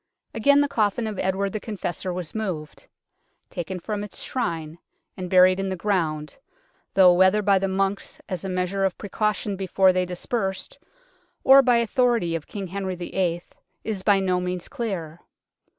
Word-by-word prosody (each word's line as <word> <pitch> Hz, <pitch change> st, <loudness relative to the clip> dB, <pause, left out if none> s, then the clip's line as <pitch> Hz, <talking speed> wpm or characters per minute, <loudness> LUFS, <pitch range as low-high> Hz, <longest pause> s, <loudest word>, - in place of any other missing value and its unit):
Again 285 Hz, +6 st, +4 dB
the 285 Hz, -, +2 dB
coffin 225 Hz, -4 st, 0 dB
of 215 Hz, -3 st, -4 dB
Edward 190 Hz, +1 st, -1 dB
the 215 Hz, -, -2 dB
Confessor 190 Hz, -4 st, -4 dB
was 175 Hz, -3 st, -5 dB
moved 180 Hz, -9 st, -5 dB, 0.6 s
taken 180 Hz, +2 st, -4 dB
from 205 Hz, +3 st, -4 dB
its 205 Hz, -, -7 dB
Shrine 165 Hz, -9 st, -3 dB, 0.4 s
and 180 Hz, -1 st, -6 dB
buried 185 Hz, 0 st, +5 dB
in 195 Hz, 0 st, -1 dB
the 190 Hz, -, -2 dB
ground, 165 Hz, -, -2 dB, 0.6 s
though 185 Hz, -2 st, +7 dB
whether 190 Hz, +4 st, +4 dB
by 200 Hz, -1 st, +4 dB
the 195 Hz, -, 0 dB
monks 195 Hz, +1 st, -2 dB
as 185 Hz, -3 st, -4 dB
a 190 Hz, -, -4 dB
measure 185 Hz, +1 st, -1 dB
of 190 Hz, -2 st, 0 dB
precaution 210 Hz, 0 st, -2 dB
before 190 Hz, 0 st, +3 dB
they 180 Hz, 0 st, 0 dB
dispersed, 190 Hz, +1 st, -4 dB, 0.6 s
or 270 Hz, +1 st, +8 dB
by 250 Hz, -2 st, +3 dB
authority 235 Hz, -6 st, +1 dB
of 160 Hz, -, -5 dB
King 200 Hz, -2 st, -5 dB
Henry 190 Hz, 0 st, -4 dB
VIII. 175 Hz, -1 st, -2 dB, 0.4 s
is 215 Hz, -4 st, -3 dB
by 200 Hz, 0 st, +4 dB
no 185 Hz, -1 st, +1 dB
means 180 Hz, -1 st, -4 dB
clear. 185 Hz, -, -5 dB
190 Hz, 165 wpm, -24 LUFS, 180-210 Hz, 0.6 s, or